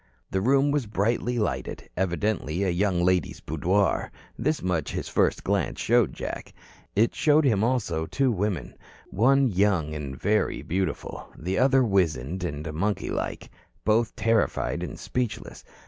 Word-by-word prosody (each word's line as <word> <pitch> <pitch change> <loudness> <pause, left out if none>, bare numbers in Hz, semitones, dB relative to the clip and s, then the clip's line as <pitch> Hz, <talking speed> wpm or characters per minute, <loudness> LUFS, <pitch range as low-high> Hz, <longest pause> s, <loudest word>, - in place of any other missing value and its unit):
The 95 - 0
room 135 +5 +3
was 145 -6 0
brightly 115 +4 0
lighted, 70 - -2
evidently 95 -1 -1
a 95 - +1
young 90 -1 +1
lady's 90 -3 +1
boudoir. 90 +6 0 0.2
This 155 +1 -1
much 85 -5 -1
his - - -3
first - - +1
glance - - 0
showed 120 -2 +3
Jack. - - -6 0.4
It 110 +3 +3
showed 150 0 +3
him 110 -6 +3
also 100 -10 0
two 130 +9 +1
women 100 - -2 0.4
one 135 +7 +4
young 90 -5 +1
and 70 -3 -6
very 105 +1 +1
beautiful, 95 +3 -3
the 95 +3 -2
other 135 0 +5
wizened 90 - 0
and 75 -1 -4
monkey 100 +6 -1
like, - - -4 0.3
both 110 +1 +2
terrified 115 0 +1
and - - -5
speechless. 125 -4 -4
100 Hz, 145 wpm, -26 LUFS, 85-120 Hz, 0.4 s, other